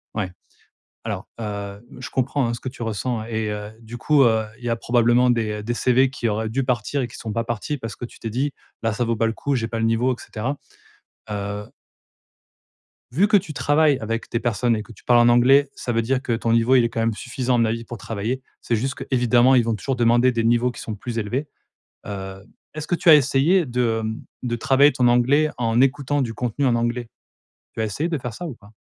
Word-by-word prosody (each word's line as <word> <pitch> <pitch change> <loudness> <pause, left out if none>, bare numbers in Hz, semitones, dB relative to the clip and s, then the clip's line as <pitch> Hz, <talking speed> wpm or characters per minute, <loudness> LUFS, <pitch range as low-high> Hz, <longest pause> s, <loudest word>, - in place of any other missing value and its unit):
Ouais. 95 -4 -2 0.7
Alors, - - -4
heu, 100 -1 -5 0.2
je - - -7
comprends, 130 +1 0
hein, 115 - -1
ce 115 - -5
que 130 - -5
tu 125 -2 -8
ressens 110 +1 -2
et 110 -2 -2
heu, 105 0 -5
du 115 +2 -9
coup, 145 +1 +4
heu, 110 -2 +3
il 120 - -11
y - - 0
a 115 - +1
probablement 120 +1 +3
des, 115 -3 0
heu, - - -7
des 120 +2 -2
CV 130 +2 +3
qui 120 -4 -2
auraient 110 +1 -2
dû 135 +4 -1
partir 125 +3 -1
et 120 - -2
qui - - -13
sont 110 -2 -5
pas 115 - -1
partis, 120 +6 -3
parce 115 -3 -6
que 120 - -6
tu - - -14
t'es 115 - -4
dit: 135 +6 -1 0.3
«Bah, 115 -1 +1
ça 120 - -1
ne - - -2
vaut 115 - +1
pas 115 - +1
le 115 - 0
coup, 140 +3 -2
j'ai 115 -2 -1
pas 115 0 -4
le 115 - +1
niveau» 115 +3 +2
et - - -10
cetera. 130 +6 -4 0.7
Heu 100 0 -4 1.5
vu 185 - +3
que 210 -1 +5
tu 170 -5 -4
travailles 145 0 +3
avec 115 +1 -4
des 115 - 0
personnes 120 0 +1
et 105 - -4
que 120 - -15
tu - - -20
parles 120 -1 +5
en 120 - +6
anglais, 135 +4 +5
ça 120 - -4
veut 115 -1 +1
dire 130 +3 0
que 120 -4 -2
ton 115 0 -1
niveau, 115 +3 +4
il 125 - +5
est 115 - +1
quand 115 - -4
même 115 0 +1
suffisant, 125 0 -2
à - - +2
mon 115 - +3
avis, 115 +1 -2
pour 120 +1 -8
travailler. 115 +5 -3 0.2
C'est 115 - 0
juste 130 +5 -1
que, - - -6
évidemment, 125 0 +4
ils 120 - +5
vont 115 -1 0
toujours 130 +6 -2
demander 120 +1 +4
des 115 -1 -1
niveaux 120 +2 +2
qui - - -11
sont 110 - -5
plus 115 +3 -6
élevés. 120 +7 -2 0.6
Heu, 95 -1 -7 0.3
est-ce 155 0 -5
que 175 - 0
tu 170 - 0
as 155 - +11
essayé 145 +6 +3
de, 120 -2 0
hem, 110 0 -4 0.2
de 120 -1 -1
travailler 135 +5 +4
ton 125 -1 +3
anglais, 135 +6 +3
en 115 0 +1
écoutant 140 +1 +2
du 115 -3 -3
contenu 125 +3 -1
en 120 -2 +3
anglais? 120 0 -1 0.7
Tu 110 - -3
as - - +1
essayé 140 +11 -2
de 160 - -1
faire 125 -4 -6
ça 175 - -6
ou 150 - -6
pas? 100 -1 -19
120 Hz, 250 wpm, -22 LUFS, 115-130 Hz, 1.5 s, as